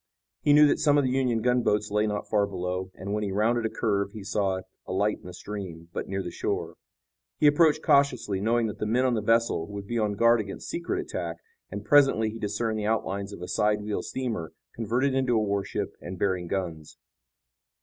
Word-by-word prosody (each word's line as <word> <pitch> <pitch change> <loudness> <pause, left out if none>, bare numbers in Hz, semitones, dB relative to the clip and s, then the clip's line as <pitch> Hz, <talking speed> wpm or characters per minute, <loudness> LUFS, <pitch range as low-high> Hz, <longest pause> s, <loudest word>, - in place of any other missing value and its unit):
He 145 - +3
knew 150 +1 +8
that 145 - +2
some 145 -2 +4
of 145 - +4
the 130 - 0
Union 125 -4 +1
gunboats 115 -4 +1
lay 105 +1 +2
not 105 -1 -3
far 105 -1 +2
below, 90 -1 -3
and, 100 +2 -5
when 105 - 0
he 100 - -2
rounded 115 +3 +1
a - - -6
curve, 100 -4 -1
he 105 - -8
saw 95 -2 -1 0.3
a - - -5
light 105 +3 +1
in - - -13
the - - -7
stream, 90 -6 -7
but - - -4
near 95 0 -2
the 90 - -5
shore. - - -3 0.6
He - - +1
approached 150 +1 +5
cautiously, 125 -9 +2
knowing 115 +2 +2
that 105 - -5
the 105 - -1
men 125 +4 +2
on 125 - +2
the 110 - 0
vessel 115 -6 +2
would 100 -1 -7
be 120 +3 -2
on 105 -2 +1
guard 115 +3 +4
against 100 -2 -6
secret 170 -1 -2
attack, - - -4 0.3
and - - -6
presently 135 -7 +4
he 115 - -8
discerned 110 +1 -1
the 105 - -2
outlines 100 -2 -1
of 95 -3 -8
a - - -5
sidewheel 105 0 0
steamer, 115 -11 -4 0.2
converted 120 +5 0
into 130 -2 +1
a - - +4
warship 100 -1 -2
and 90 +1 -7
bearing 90 -2 0
guns. 85 -5 -4
105 Hz, 210 wpm, -27 LUFS, 100-120 Hz, 0.6 s, knew